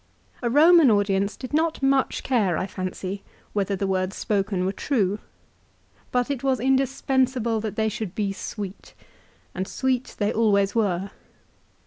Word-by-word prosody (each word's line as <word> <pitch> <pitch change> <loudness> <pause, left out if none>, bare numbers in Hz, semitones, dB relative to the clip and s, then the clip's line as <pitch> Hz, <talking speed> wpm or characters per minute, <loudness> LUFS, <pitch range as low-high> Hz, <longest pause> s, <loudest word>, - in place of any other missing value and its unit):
A 240 - 0
Eoman 315 +2 +7
audience 200 -1 +1
did 255 +2 -8
not 315 -2 +1
much 270 -1 +2
care, 210 -10 +1
I - - -1
fancy, 190 0 -5 0.3
whether 200 -1 0
the 195 - -2
words 190 0 -1
spoken 195 -3 -1
were 190 - +1
true. 205 -3 0 0.9
But 250 +2 +1
it 270 -3 -3
was 265 -3 +1
indispensable 260 -2 +1
that 215 -1 -4
they 220 0 +1
should 210 -3 -4
be 200 -2 -1
sweet, 200 -1 -7 0.6
and 185 +1 -3
sweet 260 +1 -1
they 205 -1 0
always 200 -3 +2
were. 195 -4 0
215 Hz, 145 wpm, -24 LUFS, 195-260 Hz, 0.9 s, Eoman